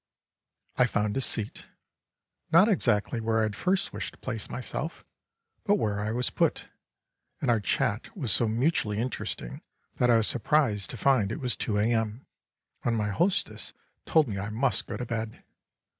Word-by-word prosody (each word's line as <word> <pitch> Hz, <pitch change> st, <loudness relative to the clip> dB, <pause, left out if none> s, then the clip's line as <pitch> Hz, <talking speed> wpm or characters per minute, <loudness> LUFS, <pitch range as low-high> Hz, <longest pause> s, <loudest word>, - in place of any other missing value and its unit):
I 125 Hz, -, +5 dB
found 105 Hz, -3 st, -1 dB
a 135 Hz, -, 0 dB
seat 110 Hz, -4 st, +2 dB, 0.8 s
not 170 Hz, +6 st, +7 dB
exactly 115 Hz, -, +1 dB
where 110 Hz, 0 st, +1 dB
I -, -, +2 dB
had 110 Hz, -1 st, -2 dB
first 185 Hz, -, 0 dB
wished -, -, -4 dB
to -, -, -26 dB
place -, -, -4 dB
myself, -, -, -5 dB, 0.6 s
but 205 Hz, -, +3 dB
where 105 Hz, -, -1 dB
I 105 Hz, +1 st, -2 dB
was 125 Hz, +2 st, 0 dB
put -, -, 0 dB, 0.7 s
and -, -, +1 dB
our 115 Hz, -, +3 dB
chat 110 Hz, -, -1 dB
was 130 Hz, -, -1 dB
so 115 Hz, -, +4 dB
mutually 115 Hz, -2 st, 0 dB
interesting 110 Hz, -, -4 dB, 0.4 s
that 125 Hz, -, +3 dB
I 115 Hz, -, +6 dB
was 110 Hz, -, +2 dB
surprised 120 Hz, -6 st, +1 dB
to -, -, -5 dB
find 115 Hz, -6 st, +2 dB
it 120 Hz, -, -4 dB
was 125 Hz, -4 st, 0 dB
2 105 Hz, -, -2 dB
A.M. 110 Hz, +2 st, 0 dB, 0.6 s
when 120 Hz, -, 0 dB
my 105 Hz, -2 st, 0 dB
hostess 180 Hz, -, -1 dB, 0.3 s
told 155 Hz, -3 st, +4 dB
me 100 Hz, -4 st, -4 dB
I 100 Hz, +2 st, -4 dB
must 110 Hz, -1 st, 0 dB
go -, -, -4 dB
to 125 Hz, -, -4 dB
bed. 115 Hz, -1 st, -5 dB
115 Hz, 175 wpm, -28 LUFS, 105-130 Hz, 0.8 s, not